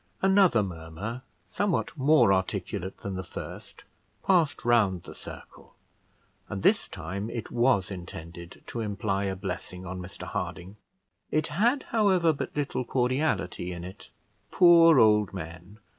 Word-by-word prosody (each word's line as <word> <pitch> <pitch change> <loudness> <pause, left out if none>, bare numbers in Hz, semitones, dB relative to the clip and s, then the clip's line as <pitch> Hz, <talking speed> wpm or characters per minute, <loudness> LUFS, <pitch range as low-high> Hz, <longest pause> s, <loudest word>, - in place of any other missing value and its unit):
Another 190 - +5
murmur, 90 +7 -6 0.2
somewhat 200 -6 -1
more 145 -7 +5
articulate 95 0 -2
than 100 - -4
the 95 0 -4
first, 85 - -9 0.4
passed 170 -10 +2
round 105 -7 +3
the - - -10
circle, - - -12 0.7
and 100 -1 -5
this - - +3
time 100 +3 -5
it 115 -2 -6
was 120 -6 +2
intended 85 -1 -9
to 120 - -6
imply 100 -2 -1
a 95 -1 -2
blessing 95 -1 -6
on 90 +1 -5
Mr 90 +1 -9
Harding. 95 +3 -5 0.5
It 155 +1 0
had, 235 - +2
however, 190 -7 +3
but 140 - -5
little 140 -3 -1
cordiality 125 - -1
in 85 -1 -6
it. 95 +3 -10 0.4
Poor 170 -3 +7
old 105 -4 +4
men! 90 +3 -9
105 Hz, 135 wpm, -27 LUFS, 95-150 Hz, 0.7 s, Poor